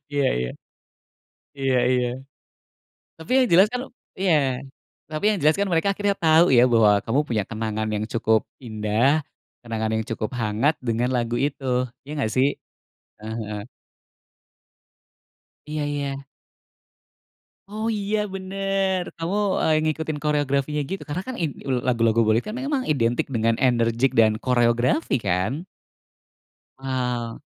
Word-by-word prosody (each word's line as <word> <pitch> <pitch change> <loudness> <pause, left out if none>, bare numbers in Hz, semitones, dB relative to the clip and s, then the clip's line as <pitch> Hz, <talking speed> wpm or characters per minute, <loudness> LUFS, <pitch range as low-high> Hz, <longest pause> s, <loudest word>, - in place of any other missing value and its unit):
Iya 140 -2 +2
iya. 60 0 -2 1.1
Iya 135 -1 +1
iya. 125 -1 +2 1.1
Tapi 160 +8 -9
yang - - +1
jelas 190 +4 +7
kan 250 - -1 0.4
iya, 190 -3 +3 0.8
tapi 155 +4 -4
yang 210 - +1
jelas 155 +2 +4
kan 200 - +1
mereka 165 +3 +2
akhirnya 205 -1 0
tahu 160 +2 +6
ya 120 - +7
bahwa 110 -3 +5
kamu 120 +5 +1
punya 110 -4 0
kenangan 110 -1 -3
yang 105 - -2
cukup 110 -1 +2 0.2
indah, 115 +6 +1 0.4
kenangan 110 -2 -2
yang 110 - -1
cukup 110 -1 -2
hangat 115 +8 +1
dengan 120 +1 0
lagu 120 -1 -1
itu, 140 0 -2 0.4
iya 140 - -10
nggak 110 -6 -1
sih? 130 +1 +4 0.7
Heeh 110 +1 -6
heeh. 105 -1 -5 2.0
Iya 150 0 -3
iya. 140 -1 -3 1.4
Oh, 215 +2 -4
iya, 210 0 -1 0.2
bener. 195 0 -1 0.2
Kamu, 170 +5 -2 0.2
eee, 160 - +3
ngikutin 155 -1 -2
koreografinya 145 -1 0
gitu 195 - -4
karena 155 +5 -3
kan 260 - -4
in 160 - 0 0.2
ul 125 -2 0
lagu-lagu 115 -2 +2
Bollywood 110 +2 +2
kan 220 - -4
memang 270 0 -1
identik 120 -5 +1
dengan 115 -3 +1
enerjik 120 0 +2
dan 110 -1 +4
koreografi 120 +2 +2
kan? 115 - -1 1.1
Wow. 125 -2 -3
130 Hz, 135 wpm, -23 LUFS, 115-160 Hz, 2.0 s, jelas